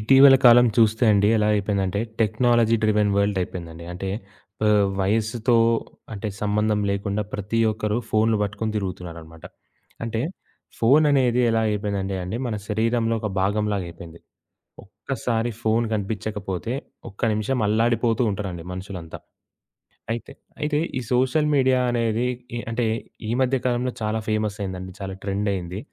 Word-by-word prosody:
ఇటీవల 135 Hz, +4 st, +7 dB
కాలం 120 Hz, +1 st, +8 dB
చూస్తే 110 Hz, +1 st, +4 dB
అండి. 100 Hz, 0 st, +4 dB
ఎలా 105 Hz, -1 st, +2 dB
అయిపోయిందంటే 100 Hz, -1 st, 0 dB, 0.2 s
టెక్నాలజీ 115 Hz, +1 st, +3 dB
డ్రివెన్ 105 Hz, -1 st, +3 dB
వరల్డ్ 100 Hz, -1 st, +1 dB
అయిపోయిందండి. 85 Hz, -2 st, -7 dB
అంటే, 95 Hz, +2 st, -5 dB, 0.6 s
ఆహ్, 105 Hz, -2 st, +4 dB
వయస్సుతో 110 Hz, +4 st, +1 dB, 0.6 s
అంటే, 110 Hz, +1 st, -4 dB
సంబంధం 105 Hz, 0 st, +1 dB
లేకుండా 100 Hz, +1 st, -1 dB
ప్రతి 105 Hz, +3 st, -1 dB
ఒక్కరు 105 Hz, 0 st, -1 dB
ఫోన్లు 110 Hz, 0 st, +2 dB
పట్టుకొని 105 Hz, +2 st, -2 dB
తిరుగుతున్నారనమాట. 85 Hz, -5 st, -6 dB, 0.6 s
అంటే, 115 Hz, 0 st, -2 dB, 0.6 s
ఫోను 140 Hz, +7 st, +5 dB
అనేది 125 Hz, -3 st, +3 dB
ఎలా 115 Hz, 0 st, +2 dB
అయిపోయిందంటే 100 Hz, -2 st, -2 dB
అండి. 90 Hz, +5 st, -4 dB
మన 115 Hz, -, -2 dB
శరీరంలో 115 Hz, +1 st, +1 dB
ఒక 105 Hz, -, -2 dB
భాగంలాగా 100 Hz, 0 st, 0 dB
అయిపోయింది. 85 Hz, 0 st, -11 dB, 0.6 s
ఒక్కసారి 115 Hz, -1 st, -3 dB
ఫోను 115 Hz, +1 st, +2 dB
కనిపించకపోతే 105 Hz, 0 st, -3 dB, 0.4 s
ఒక్క 100 Hz, -, -19 dB
నిమిషం 110 Hz, +5 st, -1 dB
అల్లాడిపోతూ 115 Hz, +2 st, +2 dB
ఉంటారండి. 95 Hz, -4 st, -5 dB
మనుషులంతా. 90 Hz, -3 st, -7 dB, 0.9 s
అయితే 115 Hz, -1 st, -5 dB, 0.3 s
అయితే 150 Hz, 0 st, 0 dB, 0.2 s
ఈ -, -, -4 dB
సోషల్ 130 Hz, +5 st, +2 dB
మీడియా 130 Hz, -2 st, +3 dB
అనేది 115 Hz, 0 st, 0 dB, 0.3 s
ఇ -, -, -2 dB
అంటే 115 Hz, +1 st, -1 dB, 0.4 s
ఈ -, -, -3 dB
మధ్య 130 Hz, +1 st, +2 dB
కాలంలో 125 Hz, 0 st, 0 dB
చాలా 110 Hz, +1 st, -1 dB
ఫేమస్ 110 Hz, -1 st, -1 dB
అయిందండి. 95 Hz, -1 st, -5 dB
చాలా 95 Hz, -1 st, -5 dB
ట్రెండ్ 100 Hz, +1 st, -1 dB
అయింది. 90 Hz, 0 st, -4 dB
105 Hz, 130 wpm, -23 LUFS, 100-115 Hz, 0.9 s, కాలం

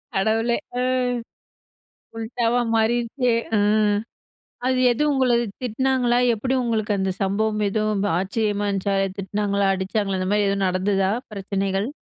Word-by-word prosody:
கடவுளே! 225 Hz, +4 st, +1 dB, 0.2 s
அ. -, -, +1 dB, 1.4 s
உல்டாவா 230 Hz, +1 st, 0 dB
மாறிருச்சே. 235 Hz, +2 st, +1 dB, 0.2 s
அ. -, -, +3 dB, 1.1 s
அது 255 Hz, 0 st, +2 dB
எது 245 Hz, +5 st, 0 dB
உங்கள 260 Hz, -2 st, +2 dB, 0.3 s
திட்டுனாங்களா! 250 Hz, +1 st, +1 dB, 0.2 s
எப்படி 255 Hz, +5 st, -2 dB
உங்களுக்கு 220 Hz, -3 st, 0 dB
அந்த 190 Hz, 0 st, 0 dB
சம்பவம் 210 Hz, +2 st, 0 dB
எதுவும் 215 Hz, -1 st, 0 dB, 0.2 s
ஆச்சரியமா 205 Hz, 0 st, -1 dB
இருந்துச்சா! 195 Hz, 0 st, -1 dB, 0.2 s
திட்டினாங்களா? 200 Hz, 0 st, 0 dB
அடிச்சாங்களா 195 Hz, 0 st, -1 dB
அந்த 185 Hz, -, -2 dB
மாரி 205 Hz, -1 st, +2 dB
எதுவும் 195 Hz, 0 st, 0 dB
நடந்ததா? 190 Hz, +1 st, +1 dB, 0.2 s
பிரச்சனைகள். 195 Hz, +1 st, -2 dB
210 Hz, 115 wpm, -23 LUFS, 195-235 Hz, 1.4 s, அ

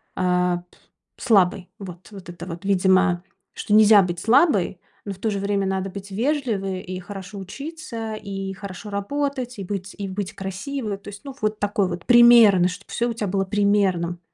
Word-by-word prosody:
а, 180 Hz, -1 st, +1 dB, 0.6 s
п -, -, -11 dB
слабой. 195 Hz, -6 st, +3 dB
Вот. 180 Hz, -1 st, -10 dB
Вот 195 Hz, -4 st, -11 dB
это 175 Hz, 0 st, -8 dB
вот, 170 Hz, +1 st, -7 dB
видимо, 185 Hz, -2 st, +3 dB, 0.3 s
что 210 Hz, -, -3 dB
нельзя 215 Hz, -1 st, +7 dB
быть 175 Hz, -1 st, -3 dB
слабой, 225 Hz, -, +3 dB, 0.3 s
но 200 Hz, -, -4 dB
в 185 Hz, -, -15 dB
то 220 Hz, -, -1 dB
же 200 Hz, -, -2 dB
время 200 Hz, -1 st, 0 dB
надо 190 Hz, 0 st, -2 dB
быть 200 Hz, +1 st, -9 dB
вежливой 215 Hz, -6 st, -1 dB
и 185 Hz, 0 st, -6 dB
хорошо 195 Hz, +1 st, -9 dB
учиться, 230 Hz, -, -6 dB
и 195 Hz, -2 st, -5 dB
хорошо 200 Hz, +1 st, -8 dB
работать, 250 Hz, +3 st, -3 dB
и -, -, -4 dB
быть 195 Hz, 0 st, -5 dB
и 200 Hz, -1 st, -4 dB
быть 200 Hz, +1 st, -4 dB
красивой. 200 Hz, +4 st, -4 dB
То 200 Hz, +1 st, -11 dB
есть, 200 Hz, 0 st, -11 dB
ну, 275 Hz, -2 st, -8 dB
вот 215 Hz, 0 st, -1 dB
такой 205 Hz, -1 st, 0 dB
вот, 175 Hz, 0 st, -6 dB
примерно, 235 Hz, -7 st, +7 dB
чтобы 200 Hz, +3 st, -10 dB
всё 240 Hz, +1 st, 0 dB
у -, -, -2 dB
тебя 215 Hz, -3 st, -3 dB
было 195 Hz, +1 st, 0 dB
примерным. 190 Hz, -4 st, +1 dB
200 Hz, 185 wpm, -23 LUFS, 185-215 Hz, 0.6 s, нельзя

